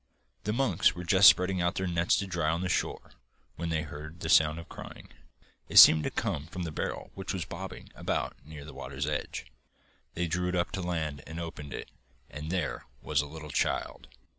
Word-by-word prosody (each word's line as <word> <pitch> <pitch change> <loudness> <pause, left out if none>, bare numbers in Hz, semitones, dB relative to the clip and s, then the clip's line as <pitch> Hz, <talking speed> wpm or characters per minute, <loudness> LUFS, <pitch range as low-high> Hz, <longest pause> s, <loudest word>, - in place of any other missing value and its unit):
The 105 - 0
monks 130 -5 +2
were 90 - -6
just 95 +3 +8
spreading 90 0 +2
out 85 0 +1
their 95 - -1
nets 85 -1 +2
to 100 - -1
dry 90 -5 -1
on 85 +2 0
the 95 - -2
shore, - - -2 0.4
when 85 +1 -4
they 80 -1 0
heard 75 +2 -9
the 80 - -3
sound 80 -2 +5
of 85 - -8
crying. - - -10 0.6
It - - 0
seemed 80 -1 +10
to - - +1
come 75 +1 -2
from 90 +1 -5
the 85 - -4
barrel - - -4
which - - -5
was - - -3
bobbing - - -8
about - - -2
near 75 -1 -10
the 75 - -10
water's 70 +2 -5
edge. 75 0 -3 0.7
They 85 - 0
drew 90 +2 -1
it 90 -1 -1
to 95 - -2
land 80 -5 -2
and 80 +2 -6
opened 75 -4 -7
it, - - -7 0.4
and 75 +2 -6
there 90 0 -2 0.2
was 75 -2 +1
a 75 - -6
little 75 0 -9
child! - - -1
80 Hz, 205 wpm, -29 LUFS, 75-90 Hz, 0.7 s, seemed